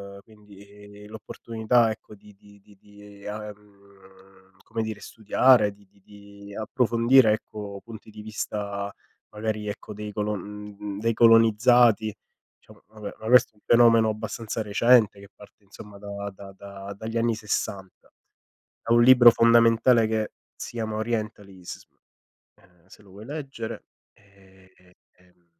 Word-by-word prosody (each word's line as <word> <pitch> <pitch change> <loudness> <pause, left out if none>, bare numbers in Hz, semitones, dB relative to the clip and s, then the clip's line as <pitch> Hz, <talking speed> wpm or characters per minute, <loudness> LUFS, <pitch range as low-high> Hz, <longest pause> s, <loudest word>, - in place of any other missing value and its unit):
ehm, - - -12
quindi 105 -1 -16
l'opportunità, 110 +1 -1
ecco, 105 0 -10
di 105 +1 -18
di 100 +1 -20
di 100 +1 -21
di, 105 -1 -17
ehm, 100 -2 -13
come 115 0 -4
dire, 110 -1 -6
studiare, 110 0 +3
di 100 -1 -24
di 100 0 -30
di 100 0 -14
approfondire, 115 +2 +3
ecco, 105 -2 -7
punti 110 -1 -12
di 105 - -11
vista, 100 -2 -5 0.4
magari, 105 0 -4
ecco, 105 +1 -8
dei 105 0 -7
colon 105 0 -5
uhm, 100 -1 -6
dei 115 +2 0
colonizzati. 115 -1 +4 0.4
Diciamo, - - -21
vabbè, 105 -1 -10
ma 110 - -8
questo 125 0 +5
è - - -40
un 105 - -29
fenomeno 115 -2 +5
abbastanza 110 +1 -5
recente 110 0 +3
che 100 0 -14
parte, 105 0 -18
insomma, 100 +1 -14
da 100 0 -7
da 100 0 -12
da 100 0 -10
dagli 115 +2 -5
anni 115 0 +1
60. 100 -3 -5 0.7
È 115 - 0
un 120 0 +5
libro 120 -1 +8
fondamentale 115 0 +4
che 110 -1 -2 0.2
si - - -8
chiama 110 -2 -4
Orientalism, 105 -5 -6 0.7
ehm, 90 -1 -28
se 95 - -18
lo 100 - -20
vuoi 100 +3 -12
leggere, 135 -7 -7 0.3
e 95 -2 -24
e, 90 0 -25 0.2
ehm 90 -1 -30
105 Hz, 145 wpm, -25 LUFS, 100-115 Hz, 0.7 s, libro